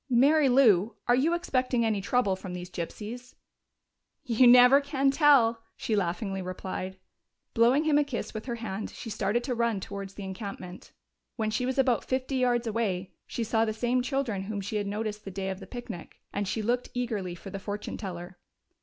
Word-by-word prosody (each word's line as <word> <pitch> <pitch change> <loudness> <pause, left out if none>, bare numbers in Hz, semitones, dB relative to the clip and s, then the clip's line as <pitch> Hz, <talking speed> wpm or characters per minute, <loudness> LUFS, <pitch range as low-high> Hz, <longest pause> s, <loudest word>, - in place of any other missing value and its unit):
"Mary 275 +4 +5
Lou, 225 -5 +4
are 240 - +5
you 295 +7 +3
expecting 255 -8 0
any 215 -3 0
trouble 205 -2 +1
from 185 -1 -8
these 180 0 -7
gypsies?" 225 +9 -6 0.9
"You 245 +1 +4
never 250 +3 +8
can 275 -1 +1
tell!" 270 -6 +5 0.2
she 220 - -1
laughingly 195 +1 -1
replied. 185 +1 -5 0.6
Blowing 245 +6 +4
him 300 -2 +4
a - - +4
kiss 280 -4 -5
with 220 +3 -6
her 240 - -2
hand, 215 -3 -5
she 225 - -8
started 210 +3 0
to 255 - -2
run 235 -3 0
towards 195 0 -7
the 205 - -7
encampment. 190 -1 -7 0.4
When 220 -2 -1
she 250 +3 -1
was 260 - -2
about 255 -3 +3
fifty 260 +1 -1
yards 245 -2 +2
away 205 -5 -1 0.2
she 235 - -3
saw 225 0 +2
the 220 -1 0
same 245 +3 +1
children 250 -7 -2
whom 205 0 -3
she 205 +2 -3
had 205 -1 -2
noticed 210 +1 -3
the 195 - -6
day 190 0 -3
of 190 - -6
the 190 - -10
picnic, 225 -6 -8
and 200 0 -2
she 215 +2 -2
looked 245 +3 0
eagerly 215 -8 -2
for 195 +2 -10
the 195 - -5
fortune 205 +1 -5
teller. 175 -2 -7
225 Hz, 190 wpm, -28 LUFS, 195-250 Hz, 0.9 s, never